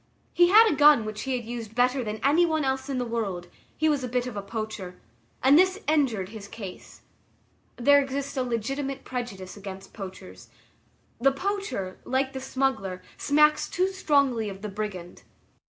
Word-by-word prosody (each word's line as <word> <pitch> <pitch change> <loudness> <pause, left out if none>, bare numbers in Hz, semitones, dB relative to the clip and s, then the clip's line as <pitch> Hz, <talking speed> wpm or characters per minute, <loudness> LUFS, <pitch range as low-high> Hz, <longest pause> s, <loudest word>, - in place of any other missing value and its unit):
He 350 0 +5
had 440 +4 +8
a 425 - +2
gun 290 -6 +6
which 215 0 -5
he 265 -1 -1
used 230 -2 -6
better 250 +2 +2
than 215 -1 -4
any 295 +6 +4
one 315 -3 +1
else 265 +1 -1
in 270 - -1
the 250 - -1
world, 200 -7 -3 0.3
he 315 - +2
was 290 -3 +1
a - - -2
bit 250 0 -1
of 250 -4 -6
a 200 - -3
poacher, 200 -3 -6 0.4
and 275 +4 +7
this 375 +1 +3
injured 255 -11 +1
his 210 -2 -9
case. 200 -4 -10 0.7
There 285 +4 +5
exists 280 +1 -4
a 265 - 0
legitimate 270 +3 -3
prejudice 225 -7 -6
against 195 -1 -9
poachers. 185 - -10 0.7
The 275 +3 +4
poacher, 375 - -3
like 265 +1 -1
the 265 - -5
smuggler, 260 -9 -2
smacks 300 +1 +3
too 370 +2 +1
strongly 280 - +1
of 195 +1 -9
the 210 - -3
brigand. 195 -4 -6
250 Hz, 170 wpm, -26 LUFS, 210-280 Hz, 0.7 s, had